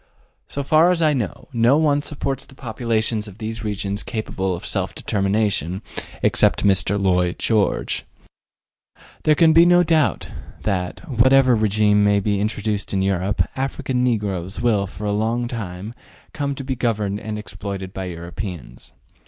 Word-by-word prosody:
So 140 - -3
far 155 +4 +4
as 175 -2 +2
I 155 -1 +4
know, 120 -7 -3
no 120 +4 +4
one 145 -2 +2
supposes 135 -2 -4
the 135 - -17
populations 115 -3 -1
of 100 -1 -12
these 110 0 -5
regions 100 -1 -2
capable 95 -5 -3
of 85 - -8
self - - -2
determination, 100 -2 -1 0.4
except - - +3
Mr. 100 0 +3
Lloyd 90 -2 +1
George. 110 -3 0 1.2
There 155 - +5
can 160 0 +5
be 165 - +8
no 175 0 +5
doubt 160 -4 +1 0.4
that, 95 - -2
whatever 130 0 +4
regime 105 -1 +3
may 100 0 +4
be 100 0 0
introduced 105 -1 -2
in 95 - +1
Europe, 95 -1 0
African 135 -1 -2
negroes 100 -6 -1
will 110 -4 +1
for 105 +2 -8
a 105 - 0
long 115 +3 0
time 100 -3 -6
to - - -39 0.4
come 140 -2 -2
be 135 -1 -4
governed 105 -4 -1
and 110 -1 -5
exploited 100 -2 -6
by 95 - -4
Europeans. 85 - -7
110 Hz, 155 wpm, -21 LUFS, 100-130 Hz, 1.2 s, be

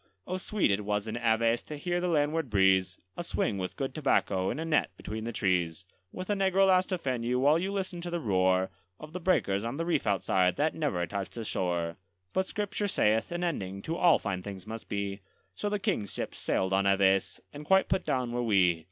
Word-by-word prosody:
Oh, 185 - -3
sweet 195 - 0
it 100 +1 0
was 105 +1 -1
in 110 - -3
Aves 115 0 +2
to 150 - -8
hear 175 +4 -1
the 180 - 0
landward 155 -2 +1
breeze, 95 -2 +3 0.2
A 175 - -4
swing 100 - -1
with 90 -1 -4
good 135 -1 -3
tobacco 100 -10 +1
in - - -2
a 160 - -3
net 155 -2 +2
between 110 +1 -5
the 120 - -3
trees, 90 -5 0 0.3
With 185 0 -6
a - - +4
negro 195 -1 +3
lass 185 -1 +4
to 185 - -1
fan 130 -7 -2
you, 125 +2 0
while 145 +5 +4
you 190 +3 -2
listened 190 -3 -3
to 175 - -5
the 175 0 -2
roar 95 - +2 0.3
Of 155 +1 -10
the 180 - -4
breakers 105 - +1
on 120 +4 -3
the 165 - -1
reef 170 -9 0
outside, 95 -2 +2
that 155 +2 +1
never 140 - -1
touched 100 +3 -5
the 115 - -4
shore. 85 -4 -2 0.4
But 190 0 +1
Scripture 205 0 -2
saith, 110 - +1
an 175 +1 -2
ending 100 - -3
to 165 - -2
all 170 -2 +5
fine 95 -2 -3
things 95 -1 -8
must 110 +1 -8
be; 100 -1 -3 0.3
So 205 - -2
the 210 - 0
King's 190 - -1
ships - - -5
sailed 95 0 0
on 100 +1 +3
Aves, 95 0 +2
and 145 +1 -8
quite 190 +5 +4
put 190 0 0
down 125 -2 -1
were 120 0 -1
we. 95 -7 +3
115 Hz, 225 wpm, -29 LUFS, -, 0.4 s, all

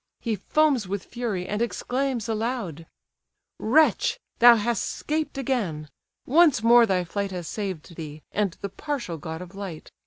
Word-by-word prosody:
He 230 -3 -1
foams 270 +1 +2
with 200 0 -4
fury, 220 -7 -3
and 210 +2 -2
exclaims 250 0 -1
aloud: 220 - -3 0.7
"Wretch! 300 +8 +3 0.2
thou 240 0 +9
hast 230 0 0
'scaped 305 -1 -3
again; 205 - -2 0.4
once 300 -5 +4
more 235 0 +7
thy 185 -2 +1
flight 200 +3 -3
Has 180 -3 -5
saved 190 -6 -5
thee, 155 -2 -8
and 200 -4 0
the 200 - -3
partial 240 - -4
god 160 +4 -6
of 180 +1 -13
light. 195 -5 -7
210 Hz, 150 wpm, -25 LUFS, 180-245 Hz, 0.7 s, thou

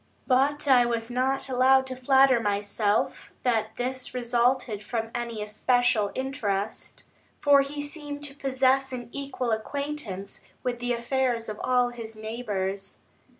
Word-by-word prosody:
But 285 +3 +2
I 255 -3 +7
was 235 0 -2
not 260 +3 0
allowed 265 +1 +4
to 260 0 -5
flatter 265 0 +5
myself 205 0 0
that 225 -3 0
this 255 +1 -3
resulted 240 -2 +1
from 225 +1 -3
any 235 -3 -3
especial 220 0 +2
interest; 220 -7 -3 0.3
for 285 -1 +5
he 290 +1 -4
seemed 290 -1 -7
to 285 -1 -3
possess 265 -1 +2
an 245 -2 -6
equal 275 -3 -3
acquaintance 220 -4 -4 0.2
with 245 -1 -2
the 245 0 0
affairs 240 -1 0
of 215 - -6
all 250 -1 +3
his 230 -2 -8
neighbours. 205 -3 -4
245 Hz, 135 wpm, -27 LUFS, 225-265 Hz, 0.3 s, I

